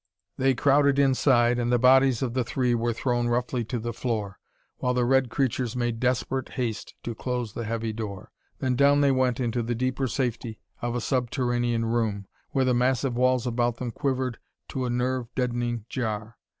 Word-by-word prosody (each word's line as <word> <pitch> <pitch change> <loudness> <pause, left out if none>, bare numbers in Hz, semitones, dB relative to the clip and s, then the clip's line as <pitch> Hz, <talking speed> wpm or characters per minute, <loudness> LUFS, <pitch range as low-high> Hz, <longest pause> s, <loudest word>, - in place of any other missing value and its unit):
They 135 0 +2
crowded 140 +2 +3
inside, 130 -3 +3
and 120 0 0
the 120 - +4
bodies 130 0 +5
of 120 -3 -2
the 130 -1 +1
three 125 +1 0
were 120 0 +1
thrown 120 +1 0
roughly 120 0 0
to 125 +2 -3
the 120 +1 -4
floor, 110 -5 -3 0.4
while 125 0 0
the 125 -1 +2
red 130 0 +3
creatures 125 -2 -1
made 120 -2 -1
desperate 130 +1 -1
haste 120 -4 -3
to 120 - -3
close 125 -2 -3
the 115 - -4
heavy 115 0 -2
door. 105 -4 -6 0.3
Then 130 -1 0
down 140 +2 +4
they 140 -1 +4
went 130 -2 +1
into 120 -1 0
the 120 +1 -2
deeper 130 +2 -1
safety 120 -2 -3 0.2
of 120 0 -2
a 120 - -1
subterranean 120 -2 0
room, 110 -3 -1 0.2
where 135 -1 +1
the 130 - +3
massive 125 +1 +1
walls 130 0 +2
about 120 -1 0
them 120 -1 -4
quivered 130 -1 -2 0.3
to 130 -2 -2
a - - -2
nerve 125 0 -1
deadening 120 -3 -1
jar. 110 -3 -4
120 Hz, 185 wpm, -26 LUFS, 115-130 Hz, 0.4 s, bodies